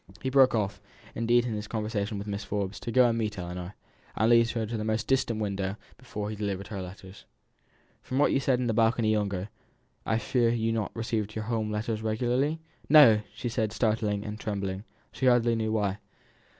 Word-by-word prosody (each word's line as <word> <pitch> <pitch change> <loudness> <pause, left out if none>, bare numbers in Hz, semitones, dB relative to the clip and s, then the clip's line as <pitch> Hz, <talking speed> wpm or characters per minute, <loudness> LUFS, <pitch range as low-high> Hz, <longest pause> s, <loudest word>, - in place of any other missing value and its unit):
He 130 - -3
broke 130 -2 +5
off, 105 -3 -1 0.3
indeed, 120 +1 +2
in 120 - -2
his 105 0 -4
conversation 105 -2 -2
with 100 - -5
Mrs. 105 0 -4
Forbes 100 -1 -3
to 120 - -5
go 125 +1 +5
and 115 - +1
meet 110 -3 -2
Ellinor, 90 +1 -6 0.4
and 110 +2 +3
to - - +8
lead 115 0 +4
her 115 -1 -2
into 110 +2 -4
the 105 - -2
most 110 +1 -1
distant 120 -4 +1
window 100 -2 -2 0.2
before 105 -5 -6
he - - -5
delivered 100 -2 -4
her 100 -3 -4
letters. 95 +1 -11 0.8
"From 130 - -4
what 145 - +4
you - - +2
said 135 -2 +2
in 125 - -1
the 115 - +1
balcony 115 0 +2
yonder, 100 -2 -1 0.5
I 110 - 0
fear 120 0 +1
you 115 -1 0
have - - +1
not 110 -3 -3
received 110 -2 -2
your 110 -1 -3
home 110 -2 -1
letters 105 +1 -2
regularly?" 125 +8 0 0.3
"No!" 150 -4 +9
replied 105 -1 0
she, 120 +2 -3
startled 110 -1 0
and 105 +1 -4
trembling, 100 -1 -3 0.3
she 130 - -1
hardly 120 -1 +4
knew 110 -1 -1
why. 105 -2 0
110 Hz, 205 wpm, -28 LUFS, 105-115 Hz, 0.8 s, No